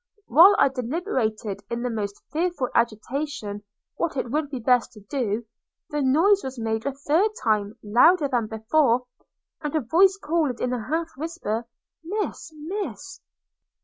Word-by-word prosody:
While 345 Hz, -, +7 dB
I -, -, +5 dB
deliberated 245 Hz, -, -2 dB
in 235 Hz, 0 st, -3 dB
the 250 Hz, -, -1 dB
most 205 Hz, -2 st, -4 dB
fearful 315 Hz, -4 st, -1 dB
agitation 235 Hz, -1 st, -2 dB, 0.4 s
what 330 Hz, -4 st, -1 dB
it 245 Hz, -2 st, -2 dB
would 300 Hz, 0 st, -1 dB
be 275 Hz, -, -4 dB
best 245 Hz, +1 st, +2 dB
to 210 Hz, -, -13 dB
do, 225 Hz, 0 st, -2 dB, 0.5 s
the 295 Hz, 0 st, -1 dB
noise 330 Hz, +10 st, +4 dB
was 265 Hz, -1 st, -6 dB
made 225 Hz, +1 st, -2 dB
a -, -, +1 dB
third 300 Hz, +9 st, +1 dB
time, 210 Hz, 0 st, +1 dB
louder 285 Hz, -, +5 dB
than 240 Hz, -5 st, 0 dB
before; 240 Hz, +3 st, +2 dB, 0.6 s
and 295 Hz, 0 st, -3 dB
a 310 Hz, -, +2 dB
voice 370 Hz, -, +4 dB
called, 300 Hz, -7 st, -1 dB
in 250 Hz, 0 st, -1 dB
a 235 Hz, -4 st, -4 dB
half 325 Hz, +1 st, -1 dB
whisper, 270 Hz, -8 st, -3 dB, 0.4 s
Miss! 400 Hz, -2 st, -4 dB
Miss! 375 Hz, +3 st, -6 dB
265 Hz, 150 wpm, -25 LUFS, 230-320 Hz, 0.6 s, While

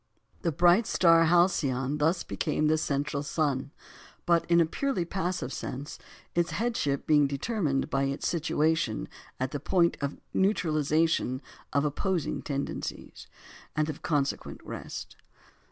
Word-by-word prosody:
The 170 Hz, -, 0 dB
bright 175 Hz, +8 st, +4 dB
star 165 Hz, -2 st, +5 dB
Alcyone 150 Hz, -6 st, +2 dB
thus 165 Hz, +4 st, +2 dB
became 155 Hz, -1 st, -1 dB
the 155 Hz, +1 st, +3 dB
"central 140 Hz, -1 st, -1 dB
sun," 145 Hz, -2 st, -1 dB, 0.6 s
but 170 Hz, -1 st, +2 dB
in 170 Hz, 0 st, +5 dB
a 165 Hz, -, +5 dB
purely 255 Hz, -, -1 dB
passive 175 Hz, -7 st, -2 dB
sense, 140 Hz, +5 st, -6 dB, 0.3 s
its 175 Hz, 0 st, +1 dB
headship 220 Hz, -, -1 dB
being 150 Hz, -2 st, +4 dB
determined 145 Hz, -, -1 dB
by 135 Hz, 0 st, +1 dB
its 135 Hz, +1 st, -2 dB
situation 160 Hz, -6 st, 0 dB, 0.3 s
at 130 Hz, +1 st, -1 dB
the 145 Hz, -, -3 dB
point 170 Hz, 0 st, +2 dB
of 140 Hz, 0 st, -2 dB, 0.2 s
neutralisation 160 Hz, -7 st, +1 dB, 0.3 s
of 140 Hz, +1 st, +2 dB
opposing 175 Hz, +3 st, -1 dB
tendencies, 140 Hz, -1 st, -5 dB, 0.5 s
and 155 Hz, 0 st, +1 dB
of 145 Hz, -, -12 dB
consequent 145 Hz, -3 st, -1 dB
rest. -, -, -7 dB
155 Hz, 130 wpm, -28 LUFS, 140-175 Hz, 0.6 s, star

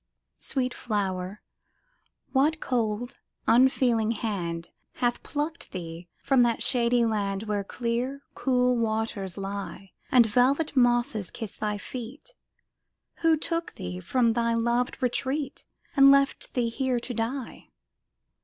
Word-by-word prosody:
Sweet 255 Hz, -2 st, -1 dB
flower, 195 Hz, -3 st, -3 dB, 0.9 s
what 300 Hz, +4 st, +3 dB
cold, 240 Hz, -1 st, -1 dB, 0.3 s
unfeeling 235 Hz, -2 st, +4 dB
hand 175 Hz, -7 st, -3 dB, 0.2 s
Hath 240 Hz, -1 st, 0 dB
plucked 300 Hz, +3 st, -4 dB
thee 170 Hz, -1 st, -6 dB, 0.2 s
from 270 Hz, -2 st, +4 dB
that 235 Hz, -1 st, +2 dB
shady 240 Hz, -1 st, +3 dB
land 200 Hz, -2 st, -1 dB
Where 210 Hz, -2 st, -1 dB
clear, 245 Hz, +6 st, -2 dB
cool 250 Hz, -2 st, +2 dB
waters 220 Hz, -4 st, -2 dB
lie, 195 Hz, -1 st, -6 dB, 0.2 s
And 250 Hz, -4 st, +7 dB
velvet 260 Hz, +8 st, +2 dB
mosses 240 Hz, -6 st, +2 dB
kissed 225 Hz, -4 st, -7 dB
thy 210 Hz, -1 st, -1 dB
feet? 255 Hz, -, -8 dB, 0.8 s
Who 325 Hz, -1 st, +3 dB
took 335 Hz, +2 st, -2 dB
thee 90 Hz, 0 st, -5 dB
from 235 Hz, -, +2 dB
thy 235 Hz, 0 st, +1 dB
loved 235 Hz, +2 st, 0 dB
retreat, 270 Hz, +3 st, -1 dB, 0.3 s
And 275 Hz, -1 st, +8 dB
left 275 Hz, 0 st, +2 dB
thee 240 Hz, -2 st, +1 dB
here 255 Hz, +1 st, 0 dB
to 245 Hz, +1 st, -6 dB
die? 235 Hz, +3 st, -4 dB
235 Hz, 120 wpm, -27 LUFS, 210-260 Hz, 0.9 s, And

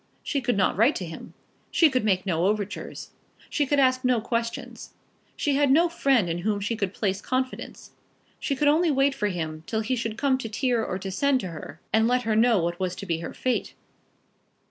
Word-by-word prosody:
She 280 Hz, -, -1 dB
could 245 Hz, -4 st, 0 dB
not 190 Hz, -, +2 dB
write 230 Hz, +9 st, +4 dB
to 185 Hz, -, -4 dB
him. 165 Hz, -1 st, -10 dB, 0.3 s
She 330 Hz, -, +5 dB
could 255 Hz, -5 st, 0 dB
make 190 Hz, -3 st, +1 dB
no 175 Hz, -1 st, +1 dB
overtures. 205 Hz, 0 st, -3 dB, 0.4 s
She 290 Hz, -2 st, +1 dB
could 290 Hz, -, +1 dB
ask 255 Hz, -1 st, +3 dB
no 250 Hz, -2 st, +3 dB
questions. 230 Hz, +1 st, -4 dB, 0.4 s
She 290 Hz, -, 0 dB
had 285 Hz, 0 st, +3 dB
no 330 Hz, +6 st, +5 dB
friend 275 Hz, -, +2 dB
in 170 Hz, +1 st, -2 dB
whom 205 Hz, +3 st, 0 dB
she 205 Hz, +3 st, -2 dB
could 200 Hz, -4 st, -2 dB
place 195 Hz, -1 st, -2 dB
confidence. 255 Hz, +2 st, -4 dB, 0.5 s
She 280 Hz, -, -1 dB
could 290 Hz, +2 st, +1 dB
only 320 Hz, +4 st, +4 dB
wait 275 Hz, -1 st, +3 dB
for 210 Hz, -, -1 dB
him, 160 Hz, -4 st, -4 dB
till 220 Hz, -1 st, -1 dB
he 245 Hz, +4 st, -1 dB
should 225 Hz, -2 st, -3 dB
come 265 Hz, -1 st, +2 dB
to 230 Hz, +2 st, -2 dB
her 235 Hz, -2 st, +2 dB
or 185 Hz, -3 st, -3 dB
send 255 Hz, +9 st, +1 dB
to 185 Hz, -, -5 dB
her, 155 Hz, -1 st, -9 dB
and 220 Hz, +1 st, +4 dB
let 250 Hz, +1 st, +2 dB
her 220 Hz, -2 st, 0 dB
know 225 Hz, -4 st, +4 dB
what 170 Hz, 0 st, -2 dB
was 185 Hz, -1 st, -2 dB
to 200 Hz, -, -7 dB
be 165 Hz, -3 st, -1 dB
her 170 Hz, -, -7 dB
fate. 255 Hz, -1 st, -1 dB
225 Hz, 210 wpm, -26 LUFS, 190-265 Hz, 0.5 s, She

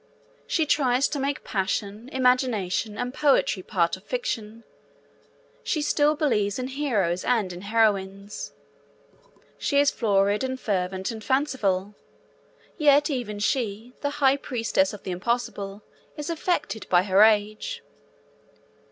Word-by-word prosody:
She 320 Hz, -, +1 dB
tries 270 Hz, -3 st, +2 dB
to 295 Hz, -, -3 dB
make 275 Hz, +1 st, -2 dB
passion, 205 Hz, +4 st, -3 dB
imagination, 245 Hz, -6 st, +1 dB
and 245 Hz, +1 st, -3 dB
poetry 275 Hz, -10 st, +2 dB
part 175 Hz, -3 st, 0 dB
of 190 Hz, -, -16 dB
fiction. 230 Hz, -, -4 dB, 1.0 s
She 305 Hz, -3 st, -1 dB
still 295 Hz, 0 st, +2 dB
believes 215 Hz, -10 st, +1 dB
in 255 Hz, 0 st, -3 dB
heroes 215 Hz, -11 st, 0 dB
and 215 Hz, -7 st, +1 dB
in 175 Hz, -, -8 dB
heroines. 200 Hz, -2 st, 0 dB, 1.1 s
She 280 Hz, -, +2 dB
is 285 Hz, 0 st, +4 dB
florid 205 Hz, 0 st, +1 dB
and 260 Hz, 0 st, -3 dB
fervent 190 Hz, -1 st, -2 dB
and 220 Hz, -1 st, -8 dB
fanciful. 210 Hz, -8 st, 0 dB, 0.9 s
Yet 295 Hz, 0 st, +4 dB
even 240 Hz, -6 st, -3 dB
she, 225 Hz, +1 st, -2 dB
the 285 Hz, -, 0 dB
high 275 Hz, -1 st, +4 dB
priestess 275 Hz, +2 st, 0 dB
of 210 Hz, -, -10 dB
the 185 Hz, -, -4 dB
impossible, 205 Hz, 0 st, -3 dB, 0.3 s
is 295 Hz, +2 st, -4 dB
affected 300 Hz, -, -2 dB
by 175 Hz, 0 st, +5 dB
her 195 Hz, 0 st, +3 dB
age. 215 Hz, -, +2 dB
225 Hz, 125 wpm, -25 LUFS, 200-275 Hz, 1.1 s, by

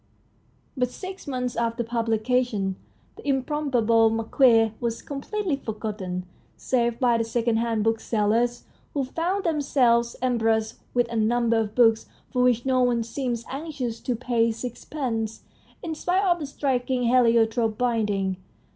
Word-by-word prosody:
But 250 Hz, -2 st, 0 dB
six 375 Hz, +6 st, -8 dB
months 250 Hz, -3 st, -2 dB
after 235 Hz, 0 st, -1 dB
publication 230 Hz, -3 st, 0 dB, 0.4 s
"The -, -, -11 dB
Improbable 255 Hz, -5 st, +2 dB
Marquis 225 Hz, 0 st, +3 dB
" -, -, -30 dB
was 235 Hz, -1 st, -2 dB
completely 310 Hz, +4 st, -3 dB
forgotten, 210 Hz, -6 st, -5 dB, 0.3 s
save 235 Hz, -2 st, 0 dB
by 240 Hz, -3 st, +3 dB
the -, -, +2 dB
second 230 Hz, 0 st, 0 dB
hand 225 Hz, -2 st, 0 dB
booksellers, 225 Hz, +1 st, +1 dB, 0.3 s
who 280 Hz, -, +1 dB
found 345 Hz, +9 st, -2 dB
them 320 Hz, -4 st, 0 dB
selves 235 Hz, -4 st, +2 dB
embarrassed 225 Hz, -3 st, 0 dB, 0.2 s
with 245 Hz, -1 st, +3 dB
a -, -, -3 dB
number 230 Hz, +1 st, +2 dB
of 215 Hz, -1 st, -3 dB
books 225 Hz, -2 st, +4 dB, 0.3 s
for 250 Hz, -, +2 dB
which 245 Hz, -1 st, +3 dB
no 260 Hz, -1 st, +2 dB
one 240 Hz, -2 st, +2 dB
seemed 235 Hz, 0 st, -3 dB
anxious 270 Hz, -5 st, -4 dB
to 250 Hz, -, -2 dB
pay 230 Hz, -1 st, +1 dB
six 235 Hz, +2 st, -7 dB
pence, 225 Hz, -7 st, -3 dB, 0.4 s
in 330 Hz, -, -3 dB
spite 365 Hz, +5 st, 0 dB
of 350 Hz, -2 st, +2 dB
the 295 Hz, -, -4 dB
striking 260 Hz, -2 st, -1 dB
heliotrope 230 Hz, -2 st, +3 dB
binding. 205 Hz, -6 st, 0 dB
235 Hz, 145 wpm, -25 LUFS, 225-260 Hz, 0.4 s, books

